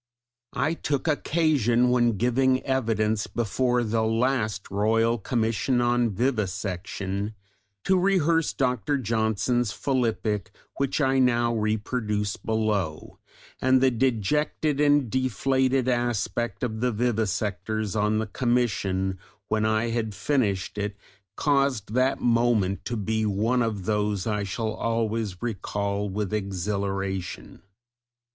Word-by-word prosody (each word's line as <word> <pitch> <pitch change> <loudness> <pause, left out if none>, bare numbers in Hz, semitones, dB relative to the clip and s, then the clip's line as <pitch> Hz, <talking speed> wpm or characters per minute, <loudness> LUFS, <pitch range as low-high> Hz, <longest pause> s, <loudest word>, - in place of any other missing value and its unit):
I 155 +3 +1
took 145 -3 -2
occasion 145 -6 +2
when 120 -3 +2
giving 130 +3 +2
evidence 110 -5 0
before 120 +2 0
the 110 0 0
last 110 -3 0
Royal 115 +3 +2
Commission 115 +3 0
on 120 -1 +2
Vivisection 100 -2 -2 0.5
to 190 -1 +3
rehearse 170 -4 +2
Dr. 125 +1 0
Johnson's 110 0 0
philippic 110 -6 -1 0.3
which 140 +1 0
I 135 -1 +3
now 120 -2 +3
reproduce 105 -1 -1
below, 105 -8 -2 0.4
and 130 0 +4
the 130 0 +4
dejected 135 +5 0
and 145 -2 +4
deflated 130 +2 +1
aspect 120 -3 -1
of 110 -3 -2
the 125 0 +2
vivisectors 110 -2 -1
on 105 0 +1
the 110 - 0
commission 105 -6 0 0.3
when 110 0 +1
I 110 +2 +1
had 110 -3 -2
finished 105 -4 0
it 100 0 -3 0.4
caused 140 -7 +1
that 130 +2 +2
moment 115 -5 +1
to 120 - -2
be 110 +2 -1
one 110 +5 +1
of 105 -5 -2
those 105 -2 0
I 105 -2 -1
shall 110 +3 -2
always 115 -3 -2
recall 100 -2 -2
with 105 +1 -3
exhilaration! 95 -1 -3
115 Hz, 115 wpm, -26 LUFS, 105-125 Hz, 0.5 s, and